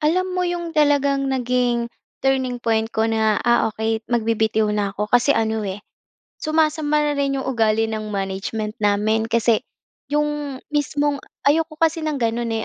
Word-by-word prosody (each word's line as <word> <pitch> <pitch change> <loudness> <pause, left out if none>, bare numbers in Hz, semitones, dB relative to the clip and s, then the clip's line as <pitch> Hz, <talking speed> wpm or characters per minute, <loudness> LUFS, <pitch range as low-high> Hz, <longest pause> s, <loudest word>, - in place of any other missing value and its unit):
Alam 345 +5 +2
mo, 365 - -1
‘yong 345 -1 -3
talagang 280 -2 +2
naging 245 -2 0 0.4
turning 260 -2 +1
point 225 -1 +1
ko 220 -1 0
na, 220 -2 +2
ah, 235 -1 +3
okey, 220 0 -1
magbibitiw 220 -2 +1
na 205 -2 -1
ako, 210 +2 -3
kasi 245 +4 +5
ano, 220 0 0
eh, 195 +1 -4 0.6
sumasama 310 -1 +1
na 295 - +1
rin 275 -1 0
‘yong 265 - -4
ugali 225 -3 +2
ng 220 -1 -3
management 200 +2 -3
namin. 215 +2 +1
Kasi 230 -1 +2 0.5
‘yong 295 -2 -1 0.2
mismong 290 -1 0 0.2
ayoko 310 +2 +2
kasi 325 0 +1
ng 305 -2 -1
gano’n, 230 -1 -1
245 Hz, 150 wpm, -21 LUFS, 220-290 Hz, 0.6 s, kasi